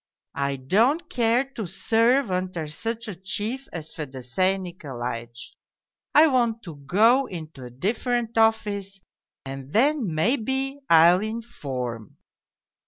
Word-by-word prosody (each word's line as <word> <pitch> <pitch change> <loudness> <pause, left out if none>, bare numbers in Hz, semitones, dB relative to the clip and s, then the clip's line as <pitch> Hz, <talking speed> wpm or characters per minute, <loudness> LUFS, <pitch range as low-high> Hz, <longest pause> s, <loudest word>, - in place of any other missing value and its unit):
I 140 0 0
don't 225 - +2
care 235 +1 +2
to 220 -7 -4
serve 230 +6 +2
under 180 -3 -2
such 225 +9 -4
a 210 - -4
chief 210 +8 -4
as 160 -2 -7
Fedosey 145 +6 -1
Nikolaitch. 120 -10 -6 0.6
I 305 - +9
want 240 -5 +1
to 165 -5 -9
go 225 - +3
into 155 -7 -8
a - - -8
different 230 - -2
office 210 -3 +1 0.5
and 135 0 -7
then, 255 - +2
maybe, 265 - 0
I'll 170 +3 +7
inform.' 140 - -5
195 Hz, 115 wpm, -25 LUFS, 150-235 Hz, 0.6 s, I